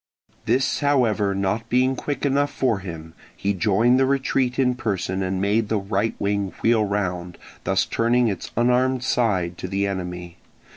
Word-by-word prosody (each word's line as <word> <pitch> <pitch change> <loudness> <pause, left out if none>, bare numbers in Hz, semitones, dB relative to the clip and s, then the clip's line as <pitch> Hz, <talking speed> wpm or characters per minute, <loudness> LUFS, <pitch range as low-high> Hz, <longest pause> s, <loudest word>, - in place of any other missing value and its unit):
This 130 +4 +1
however 115 -9 +2
not 100 +4 -1
being 130 +2 +2
quick 145 +2 -3
enough 140 +1 +1
for 125 -7 0
him, 80 -3 -8 0.2
he 100 +1 0
joined 110 +6 +3
the 135 - +3
retreat 130 -2 0
in 125 -2 +3
person 95 -5 -2
and 95 0 -1
made 105 +3 +1
the 110 - +1
right 100 +2 -1
wing 100 -1 -1
wheel 115 -1 +4
round, 90 -4 -2 0.3
thus - - +2
turning 120 +1 +2
its 100 -4 -3
unarmed 125 +1 +2
side 95 -9 0
to - - -4
the 100 +1 -1
enemy. 90 -3 -5
105 Hz, 160 wpm, -23 LUFS, 95-125 Hz, 0.3 s, wheel